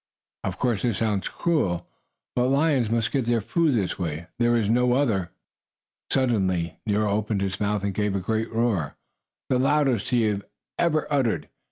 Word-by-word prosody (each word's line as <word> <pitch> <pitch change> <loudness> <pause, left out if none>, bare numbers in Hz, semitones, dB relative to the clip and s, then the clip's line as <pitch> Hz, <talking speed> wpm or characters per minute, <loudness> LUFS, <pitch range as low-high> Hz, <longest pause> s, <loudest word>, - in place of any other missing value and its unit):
Of - - -3
course 120 -5 0
this 120 -5 0
sounds 105 -4 0
cruel, 90 - 0 0.5
but 125 0 +2
lions 135 -4 +2
must 115 +1 0
get 135 -4 0
their 120 0 +2
food 145 - +1
this 100 -4 -1
way; 80 -2 -3
there 120 0 +3
is 110 -3 +1
no 125 +2 +3
other. 110 -10 +1 0.8
Suddenly 95 -10 +1
Nero 105 0 +1
opened 105 0 0
his 95 -2 -3
mouth 105 -1 0
and 100 -1 -1
gave 105 0 0
a - - +1
great 110 +4 -2
roar, 110 -10 0 0.5
the 125 - +2
loudest 135 -5 +2
he 120 -3 +2
had 105 -2 0 0.4
ever 155 -3 +2
uttered. 130 -6 0
110 Hz, 170 wpm, -25 LUFS, 100-125 Hz, 0.8 s, there